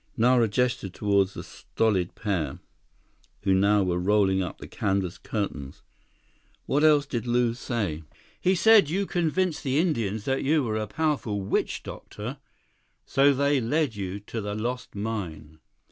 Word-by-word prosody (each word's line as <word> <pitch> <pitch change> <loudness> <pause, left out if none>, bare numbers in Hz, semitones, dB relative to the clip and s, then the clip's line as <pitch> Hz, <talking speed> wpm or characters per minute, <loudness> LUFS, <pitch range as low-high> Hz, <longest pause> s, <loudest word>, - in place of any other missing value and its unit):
Nara 120 0 +4
gestured 120 -3 -1
toward 100 -2 +2
the 100 - -9
stolid 95 -6 -1
pair 100 -8 -2 0.9
who 95 -1 +3
now 100 +2 +4
were 90 -1 0
rolling 95 0 +2
up 90 - -4
the - - -10
canvas 95 -4 -2
curtains. 80 -11 -5 0.8
"What 145 +2 +1
else 150 -2 +5
did 120 -4 -4
Lew 120 -1 +2
say?" 110 -10 -3 0.4
"He 185 +1 +2
said 215 -4 +6
you 195 +5 0
convinced 175 -1 0
the 135 0 0
Indians 115 - 0
that 135 0 0
you 150 +1 +2
were 110 -3 -2
a 110 0 -2
powerful 140 -7 -1
witch 95 - -1
doctor, 120 +7 -7 0.7
so 140 +1 +4
they 140 0 +2
led 140 +1 0
you 95 0 -4
to 110 +2 -5
the 105 0 -4
lost 120 +3 -4
mine." 85 -8 -5
110 Hz, 150 wpm, -26 LUFS, 100-140 Hz, 0.9 s, said